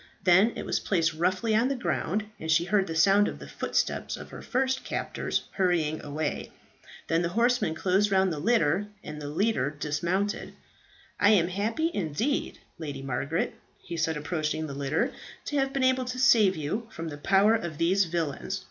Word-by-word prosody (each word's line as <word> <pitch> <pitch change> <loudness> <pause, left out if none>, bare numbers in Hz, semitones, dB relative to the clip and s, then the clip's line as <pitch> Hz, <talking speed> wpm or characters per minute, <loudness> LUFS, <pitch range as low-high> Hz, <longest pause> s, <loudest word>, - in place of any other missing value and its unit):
Then 190 +6 +5
it - - -5
was - - 0
placed 165 -4 +1
roughly 185 +7 0
on 230 +3 +3
the 275 - 0
ground, 215 -4 -1
and 160 - -6
she 165 +1 +4
heard 195 +1 +1
the 165 - -4
sound 195 +5 +5
of - - -5
the - - -10
footsteps - - -2
of - - -10
her - - -8
first 265 +1 0
captors - - -2
hurrying 170 -5 0
away. 150 +1 -3 0.6
Then 165 +1 +2
the 170 - 0
horsemen 240 -8 +2
closed 190 +5 +2
round 190 -2 +3
the 150 - -4
litter, 200 -1 +2 0.2
and 150 0 -7
the 145 - -5
leader 200 0 +1
dismounted. 170 +7 -2 0.6
"I 205 - +5
am 180 -5 +4
happy 225 - -1
indeed, 200 - -1 0.2
Lady 145 -4 -5
Margaret," 140 +5 -1 0.2
he 170 - -8
said 160 -1 0
approaching 155 0 -2
the 145 - -6
litter, 140 0 0 0.3
"to 290 - -2
have 270 -1 +1
been 270 -1 -1
able 260 0 +3
to 250 0 -4
save 230 -7 +5
you 165 +10 -3
from 165 -5 -6
the 145 - -7
power 195 +6 +4
of 170 -8 -2
these 185 +5 +3
villains. 170 +3 -3
185 Hz, 185 wpm, -27 LUFS, 155-215 Hz, 0.6 s, Then